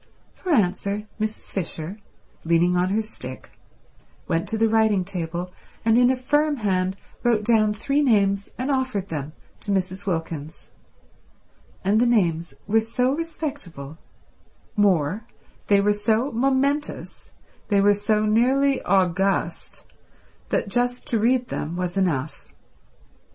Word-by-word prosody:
For 365 - -5
answer 200 - +1
Mrs. 215 0 -4
Fisher, 180 +1 -4 0.4
leaning 170 +2 +3
on 180 +1 +2
her 215 +3 +1
stick, 130 -12 -9 0.8
went 165 +1 0
to 220 - -1
the 225 +1 +3
writing 220 -4 +3
table 175 -1 -4 0.3
and 225 0 +4
in 245 +1 +5
a 260 - +3
firm 295 +4 +1
hand 190 -5 0 0.2
wrote 235 -3 +2
down 215 -2 +4
three 275 +8 0
names 200 -6 +2
and 260 +3 -1
offered 255 -8 -1
them 150 -1 -4 0.3
to - - -10
Mrs. 190 0 -2
Wilkins, 160 -3 -4 1.1
and 205 +4 +3
the 245 - +4
names 170 -9 +1
were 220 +2 +3
so 250 +3 0
respectable, 285 - -6 0.8
more, 200 0 +2 0.4
they 200 -1 +5
were 205 +1 +3
so 220 +6 +1
momentous, 275 +4 -1 0.4
they 200 -2 +3
were 205 +1 +5
so 210 +1 +1
nearly 260 +5 +3
august, 185 -1 0 0.7
that - - 0
just 245 +4 -1
to 230 - +1
read 245 +3 +2
them 160 +3 -3
was 180 0 -3
enough. 160 -7 -1
205 Hz, 130 wpm, -24 LUFS, 180-240 Hz, 1.1 s, in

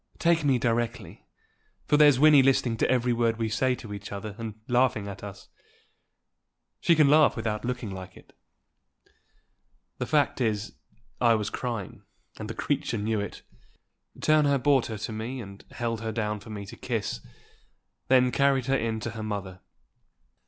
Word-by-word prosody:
Take 170 -2 +2
me 135 -3 +3
directly; 115 -5 -2 0.6
for - - +2
there's 145 -3 +6
Wynnie 150 0 +7
listening 130 -3 +2
to - - +1
every 125 -1 +2
word 115 -1 +1
we 115 -1 -1
say 125 +4 +1
to 110 -4 -9
each 100 +1 -8
other, 100 +1 -6
and 110 -2 -5
laughing 125 -4 +1
at 100 0 -8
us. 100 -1 -10 1.3
She 170 - +4
can 155 -2 +5
laugh 150 +1 +5
without 110 -1 -3
looking 125 -4 -3
like 95 -1 -9
it." - - -18 1.7
The - - -2
fact 145 -3 +1
is, 110 -2 -1 0.5
I 115 -2 +5
was 105 -2 -2
crying, 115 -6 -5 0.4
and - - -6
the - - -5
creature 115 - -1
knew 110 +1 -1
it. 100 -1 -6 0.8
Turner 150 -2 +3
brought 135 -1 +2
her 110 - -5
to 110 - -5
me, 115 +4 -5
and 100 -3 -10
held 115 -2 -3
her 110 0 -3
down 105 -1 -2
for 100 - -13
me 105 -2 -6
to - - -10
kiss; - - -3 0.9
then 125 -1 +4
carried 135 -2 +2
her 135 +1 +1
in 115 -3 -1
to 120 - -4
her 110 0 -7
mother. 100 -4 -5
115 Hz, 165 wpm, -27 LUFS, 105-130 Hz, 1.7 s, Wynnie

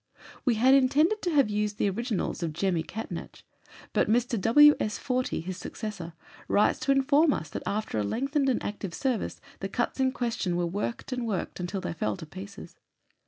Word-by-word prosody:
We 245 -4 +3
had 255 +5 +5
intended 295 +10 +4
to 355 - -1
have 280 -9 +3
used 210 0 -1
the - - +1
originals 215 0 -2
of 165 -2 -2
"Jemmy" 175 0 0
Catnach, 220 +7 -7 0.5
but - - +2
Mr. 235 -1 +1
W. 295 +8 +7
S. 210 - -1
Fortey, 255 - -1
his 185 +1 -5
successor, 185 -5 -6 0.3
writes 205 - +3
to 255 +2 +1
inform 285 +3 +4
us 155 - -4
that, - - -4
after 210 - -1
a - - +1
lengthened 275 - 0
and 250 - 0
active 200 -4 -5
service, 255 -6 -2 0.2
the 195 - -4
cuts 240 +6 -2
in 260 0 +3
question 230 -8 -2
were 175 0 0
worked 205 +9 -4
and 250 -2 -2
worked 195 -4 -3
until 180 +2 -3
they 180 - -3
fell 110 -10 -2
to - - -8
pieces. 190 +5 -10
215 Hz, 190 wpm, -28 LUFS, 185-260 Hz, 0.5 s, W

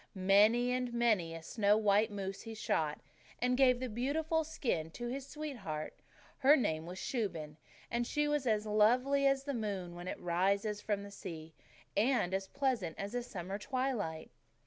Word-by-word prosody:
Many 210 +6 +4
and 250 -1 -1
many 210 -9 +2
a 165 - -8
snow 205 +2 +2
white 210 +1 +3
moose 195 -1 -5
he 225 -1 -8
shot, 155 -8 -1 0.4
and 250 0 +2
gave 255 -2 +5
the 255 - -2
beautiful 305 +8 0
skin 235 - -2
to 240 0 -4
his 270 +2 -5
sweetheart. 230 - -5 0.5
Her 280 +3 +7
name 165 - -1
was 180 +1 -7
Shuben 170 - -3 0.3
and 235 0 0
she 295 0 +1
was 295 -3 0
as 215 -1 +2
lovely 250 +7 +3
as 275 0 +2
the 280 0 -3
moon 200 -7 -3
when 175 +1 -8
it - - -4
rises 200 +4 0
from 205 -2 -1
the 200 - -9
sea, 165 -5 -8 0.4
and 215 -5 +2
as 190 0 -1
pleasant 250 - -1
as 200 +3 -5
a 245 - 0
summer 195 -4 -5
twilight. 235 -11 -2
215 Hz, 170 wpm, -34 LUFS, 190-255 Hz, 0.5 s, Her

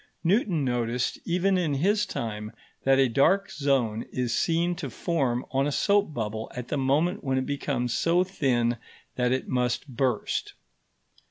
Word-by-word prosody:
Newton 180 - +2
noticed 120 -1 -1
even 185 +2 +2
in 155 -5 0
his 205 +8 +2
time 105 - -4 0.3
that 135 0 +5
a 135 -1 +5
dark 185 - +2
zone 130 -6 0
is 125 -2 -1
seen 170 +1 +1
to 145 -6 -4
form 130 -3 -1
on 135 +1 +1
a - - -1
soap 200 +3 +2
bubble 110 -4 -4
at 125 -1 -6
the - - -1
moment 155 +9 +1
when 135 -2 0
it 130 - 0
becomes 135 -4 -2
so 175 +2 +3
thin 125 -10 0 0.4
that 125 -1 +1
it 130 0 -1
must 125 +2 0
burst. 125 -3 -1
135 Hz, 160 wpm, -27 LUFS, 120-170 Hz, 0.4 s, that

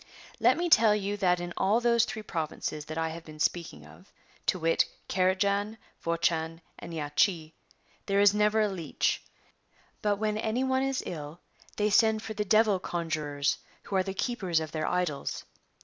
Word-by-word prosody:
^ - - -16
And - - -20
let - - +5
me 350 +1 0
tell 225 -9 +6
you 205 0 -2
that 180 -3 +2
in 175 0 -5
all 205 +4 +3
those 235 -1 +3
three 220 - -6
provinces 155 -4 -4
that 155 +1 -6
I 160 0 0
have 165 +1 -7
been 155 -1 -12
speaking 170 +2 -2
of, 185 - -17 0.4
to - - +2
wit 165 -1 +2 0.2
Carajan, 200 +3 +1 0.3
Vochan, 165 -1 0 0.2
and - - -8
Yachi, 160 +1 0 0.5
there 200 0 +2
is 205 0 +6
never 210 +1 +3
a 215 - +3
leech. 175 -7 -1 0.8
But 205 -1 +2
when 215 0 -1
any 225 +4 0
one 260 0 +1
is 270 -1 -1
ill 155 -1 -6 0.4
they 210 0 +1
send 220 +1 +4
for 220 - -5
the 210 0 -1
Devil 215 -1 +4
conjurors 155 -5 -2 0.2
who 195 - -5
are 190 - +4
the 190 +1 -4
keepers 190 -8 0
of 160 -1 -5
their 155 -1 -2
idols. 180 -6 -2
190 Hz, 180 wpm, -29 LUFS, 165-215 Hz, 0.8 s, tell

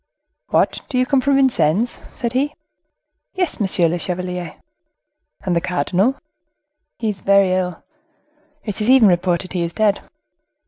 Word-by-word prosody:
"What, - - +1
do 255 - -2
you 255 - +3
come 270 0 +2
from 280 +2 +2
Vincennes?" 235 - +2
said 235 -1 -4
he. 280 +3 0 0.8
"Yes, 360 -4 -1
monsieur 190 -4 +2
le 175 +2 -1
chevalier." 180 -1 -4 0.9
"And 180 -3 -1
the 170 - +2
cardinal?" 180 - 0 0.8
"Is 210 -5 -2
very 200 -1 +4
ill; 180 -2 -2 0.8
it 210 -1 -5
is 210 - 0
even 260 -4 +7
reported 180 0 0
he 180 - -1
is 170 0 -2
dead." 210 -2 +1
195 Hz, 140 wpm, -20 LUFS, 180-245 Hz, 0.9 s, even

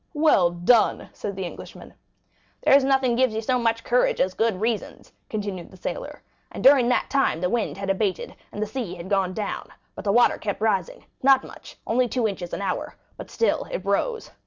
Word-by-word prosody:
"Well 295 - +4
done!" 175 +7 +2
said 200 -2 -5
the 190 -1 -4
Englishman. 175 - -10
20043m - - -22 0.7
"There's 280 - +6
nothing 265 -3 +2
gives 250 -2 +2
you 220 - -1
so 250 +3 0
much 230 -1 0
courage 245 +1 +2
as 185 - +1
good 220 -3 0
reasons," 225 0 -3 0.2
continued 200 -5 -4
the 190 - -15
sailor; - - -6 0.3
"and - - -7
during 265 -3 +6
that 250 - 0
time 270 - +2
the 180 +1 -1
wind 235 -4 -1
had 195 0 -1
abated, 195 -1 -2 0.2
and 205 - -3
the - - -1
sea 215 -3 -5
gone 190 -1 0
down, 210 -2 -4 0.2
but - - -9
the 200 - +1
water 240 +3 +4
kept 205 -2 -3
rising; 205 -5 -1 0.2
not 270 0 +5
much, - - -12
only 250 +2 +2
two 240 -1 0
inches 185 -4 -5
an 200 - -4
hour, 190 - -3 0.2
but - - -10
still 460 - 0
it - - -5
rose. 470 -2 -1
220 Hz, 200 wpm, -24 LUFS, 195-255 Hz, 0.7 s, There's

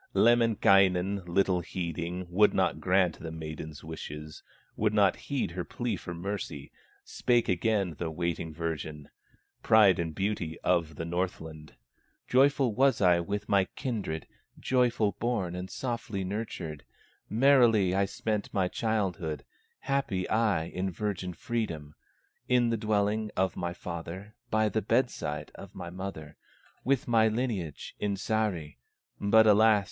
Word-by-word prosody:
Lemminkainen, 100 -5 +4
little 95 +1 +2
heeding, 85 +1 -4
Would 105 +4 +4
not 95 -4 +1
grant 90 0 +2
the 80 - -6
maiden's 80 -1 -7
wishes, 75 -1 -8 0.3
Would 105 0 +1
not 100 -3 +4
heed 140 - -3
her 90 +1 -3
plea 120 +2 -3
for 90 -2 -7
mercy. 85 -6 -5 0.3
Spake 120 -1 +1
again 95 -1 +1
the 85 - -2
waiting 85 0 -3
virgin, 75 -2 -5 0.5
Pride 105 -5 +5
and 80 -2 -3
beauty 95 -5 -2
of 85 -4 +1
the 80 - -4
Northland: 80 -3 -4 0.5
"Joyful 135 -2 +3
was 135 +4 +3
I 90 -3 +5
with 100 +4 -3
my 100 -1 +3
kindred, 100 -11 -3 0.3
Joyful 120 -5 +2
born 110 -7 -1
and 90 +1 -5
softly 115 -6 -3
nurtured; 90 - -5 0.5
Merrily 115 -6 +5
I 100 +1 +2
spent 105 +1 -3
my 95 -2 +1
childhood, 95 -8 -2 0.4
Happy 135 -10 -1
I, 110 -7 +2
in 90 +3 -3
virgin 95 -1 -3
freedom, 80 -7 -4 0.6
In 120 -2 +3
the - - +2
dwelling 105 0 0
of 95 -1 +1
my 85 -1 -3
father, 90 +4 -7 0.2
By 110 0 +2
the 110 +1 0
bedside 115 - -1
of 100 -1 -12
my 85 -2 -7
mother, 90 -5 -7 0.5
With 135 0 +1
my 115 -2 +4
lineage 110 - -3
in 105 -1 0
Sahri; 100 - -2 0.4
But 110 +2 +5
alas! 110 0 +6
95 Hz, 135 wpm, -29 LUFS, 85-110 Hz, 0.6 s, alas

